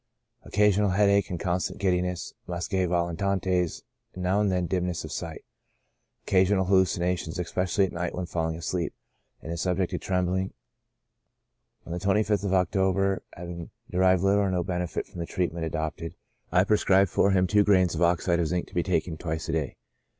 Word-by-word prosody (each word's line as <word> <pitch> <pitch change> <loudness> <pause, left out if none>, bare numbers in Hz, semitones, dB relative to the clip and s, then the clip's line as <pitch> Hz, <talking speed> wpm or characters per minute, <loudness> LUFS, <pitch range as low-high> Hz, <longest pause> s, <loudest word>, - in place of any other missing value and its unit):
Occasional 105 0 +3
headache 100 +1 +3
and 90 - -4
constant 90 +2 -2
giddiness; 90 -2 -1
muscae 90 +1 -1
volitantes, 90 0 0 0.3
and 90 - -5
now 95 +3 +2
and 100 -2 +2
then 90 -1 0
dimness 90 -1 -1
of 80 - -7
sight; 80 -2 -5 0.8
occasional 95 0 +3
hallucinations, 90 -2 +1
especially 90 +2 0
at 95 - -5
night 85 0 -3
when 90 - -3
falling 80 -2 -2
asleep; 85 0 -3 0.5
and 80 - -6
is 85 -1 -3
subject 90 -1 0
to - - -2
trembling. 95 0 -1 1.3
On - - -9
the 90 - -2
25th 100 +2 +1
of 100 -2 0
October, 95 +1 +1
having 85 -1 -7 0.2
derived 95 0 +3
little 100 +1 +4
or 100 - +1
no 90 -2 0
benefit 90 -1 -3
from - - -11
the 85 - -3
treatment 85 -3 -2
adopted, 80 +1 -4 0.4
I 90 +2 +4
prescribed 100 -2 +3
for 100 - +3
him 95 -1 +3
two 105 +3 +4
grains 95 -4 +3
of 85 - -3
oxide 85 0 +2
of 85 - +1
zinc, 90 +1 -2
to - - -22
be 85 - +2
taken 85 -2 -1
twice 80 -1 -4
a - - +1
day. 80 -4 -2
90 Hz, 170 wpm, -27 LUFS, 85-95 Hz, 1.3 s, little